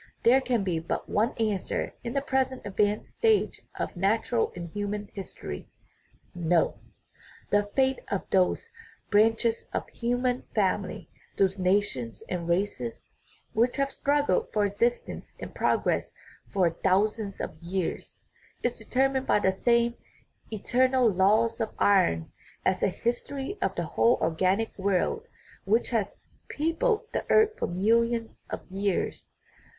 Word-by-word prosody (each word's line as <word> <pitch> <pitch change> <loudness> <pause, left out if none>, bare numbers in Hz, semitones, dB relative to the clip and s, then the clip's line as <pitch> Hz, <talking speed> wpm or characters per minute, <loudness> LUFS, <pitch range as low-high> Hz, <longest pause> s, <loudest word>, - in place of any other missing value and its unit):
There 255 +3 +6
can 245 -5 0
be 175 -4 0
but 165 - -3
one 220 +3 +1
answer 210 -4 -1
in 235 0 -4
the 275 - 0
present 265 -1 0
advanced 205 +1 0
stage 445 -2 +2 0.2
of - - -3
nat 200 +5 +1
ural 235 -2 +2
and 170 -1 -6
human 205 +1 -4
history: 195 -2 -7 0.6
No. 175 -1 +1 0.7
The 205 0 +3
fate 265 -1 +3
of 195 - -2
those 190 - +2 0.4
branch 225 +3 +4
es 230 -1 0
of - - -1
the - - -23
human 245 +1 0
family, - - 0 0.3
those 190 0 +2
nations 180 - 0
and 170 -2 -3
races 170 - -1 0.5
which 235 +3 +2
have 275 0 +1
struggled 290 - +1
for 210 -1 +2
existence 230 +4 -1
and - - -7
progress - - +1 0.4
for 175 -4 +2
thou 190 +2 +5
sands 215 -2 -5
of - - -4
years, 175 +1 -3 0.4
is 245 -1 -1
determined 265 +3 +1
by - - +4
the 190 -2 +2
same 235 +4 +2 0.6
"eternal 250 +2 +3
laws 215 +5 +3
of 220 - -3
iron" 180 - +3 0.3
as 185 - +2
the - - +2
history 265 - -3
of - - 0
the - - -2
whole 235 - +3
organic 185 +7 +1
world 200 - 0 0.4
which 220 +6 +2
has 225 -4 0 0.3
peopled 420 +10 0
the - - -1
earth 435 0 +5
for - - 0
millions 230 +5 +1
of - - -5
years. 195 0 -2
215 Hz, 140 wpm, -28 LUFS, 190-245 Hz, 0.7 s, There